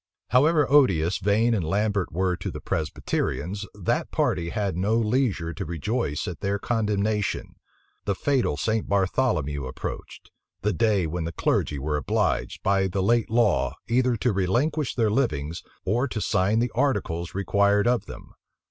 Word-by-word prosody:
However 150 +5 +4
odious 95 - +3
Vane 110 +5 +2
and 100 -6 0
Lambert 100 +3 0
were 90 +1 0
to - - -5
the - - -6
Presbyterians, 90 +5 -2
that 100 -4 -1
party 85 -1 0
had 100 -2 -2
no 100 +5 +1
leisure 110 -7 0
to 80 - -5
rejoice 85 - -2
at 90 - -5
their 100 0 -1
condemnation. 105 -2 -1 0.5
The 100 - 0
fatal 130 - 0
St. 110 +7 -1
Bartholomew 95 - +1
approached; 65 - -7 0.3
the 105 0 +1
day 100 +1 +2
when 80 +1 -3
the 85 - -3
clergy 75 -2 0
were 75 +2 -1
obliged, 75 - -1
by 95 0 +2
the 95 +1 -1
late 115 +2 +2
law, 115 -3 +2
either 125 0 +2
to 120 +1 +1
relinquish 120 - 0
their 110 -4 +2
livings, 85 - -1 0.2
or 120 +8 +1
to 115 - -4
sign 100 +1 +1
the 120 +1 +1
articles 100 -11 -1
required 100 +2 +2
of 120 0 +1
them. - - -11
100 Hz, 155 wpm, -25 LUFS, 85-115 Hz, 0.5 s, However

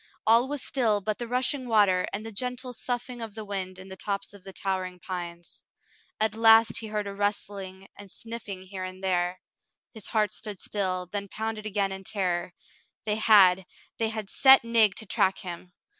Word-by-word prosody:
All 230 +3 +6
was 285 -1 -4
still 225 -6 +1
but 210 +1 -3
the 240 - -4
rushing 255 +2 0
water 205 -5 +3
and 210 +2 -4
the 225 - -6
gentle 250 +3 -4
soughing 245 0 -4
of 220 -2 -7
the 220 -1 -6
wind 190 -2 -4
in 185 0 -11
the 190 - -8
tops 200 0 -4
of 200 -2 -14
the 195 - -9
towering 185 -2 -3
pines. 175 -2 -7 0.6
At 215 -1 +1
last 225 0 +6
he 225 - -6
heard 210 -1 -2
a 200 - -5
rustling 195 -2 -3
and 205 -1 -12
sniffing 215 -4 -7
here 190 0 -7
and 185 +1 -8
there. 180 -1 0 0.5
His 220 -4 -8
heart 215 -2 +1
stood 210 -4 -5
still, 185 -3 -2
then 200 -1 -3
pounded 220 +1 -4
again 200 -2 0
in 190 0 -6
terror. 180 -3 -2 0.5
They 210 -1 +1
had 190 -4 +6 0.2
— - - -29
they 225 -1 +1
had 220 -2 -5
set 265 -1 +7
Nig 230 -3 +4
to 220 - -5
track 190 -1 +2
him. 180 -2 -7
205 Hz, 190 wpm, -27 LUFS, 190-225 Hz, 0.6 s, set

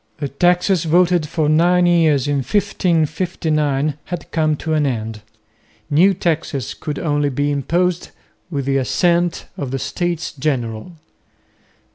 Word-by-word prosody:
The 145 -2 -4
taxes 175 +4 +2
voted 175 0 +3
for 155 -3 0
nine 175 +3 +4
years 160 -6 +3
in 145 -1 +1
1559 155 -3 0
had 175 -2 -7
come 155 -2 +1
to 160 +2 -3
an 150 -2 +2
end. 110 -3 -4 0.7
New 185 +7 +4
taxes 160 - -2
could 150 -2 -5
only 145 -3 0
be 145 +2 -1
imposed 175 +5 0 0.4
with 140 -5 -3
the 135 0 +1
assent 170 +5 +1
of 140 - -4
the 135 - -2
States 175 +5 -3
General. 130 -1 -3
155 Hz, 130 wpm, -19 LUFS, 140-175 Hz, 0.7 s, nine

